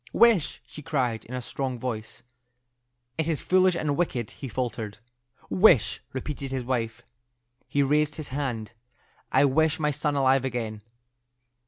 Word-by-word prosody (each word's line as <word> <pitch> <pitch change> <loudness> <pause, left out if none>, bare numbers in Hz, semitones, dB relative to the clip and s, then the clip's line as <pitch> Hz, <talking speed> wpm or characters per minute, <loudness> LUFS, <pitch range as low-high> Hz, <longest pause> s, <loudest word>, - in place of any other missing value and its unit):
"Wish!" 225 -10 +4
she 150 - -10
cried, 130 -7 -1
in 125 - -6
a 125 - -4
strong 130 +1 -2
voice. 115 0 -5 1.0
"It 160 - +1
is 160 -3 -1
foolish 185 -1 +4
and 150 -4 0
wicked," 130 -9 -1
he 135 - -7
faltered. 115 -4 -3 0.5
"Wish!" 155 - +4
repeated 135 +1 -4
his 130 -1 -2
wife. 120 -2 -2 0.6
He 140 - +2
raised 150 +2 +2
his 155 -2 -5
hand. 130 -6 -3 0.6
"I - - +5
wish 160 +4 +2
my 150 -1 +2
son 145 +1 -1
alive 135 -1 +3
again." 115 -5 -3
135 Hz, 145 wpm, -27 LUFS, 120-150 Hz, 1.0 s, I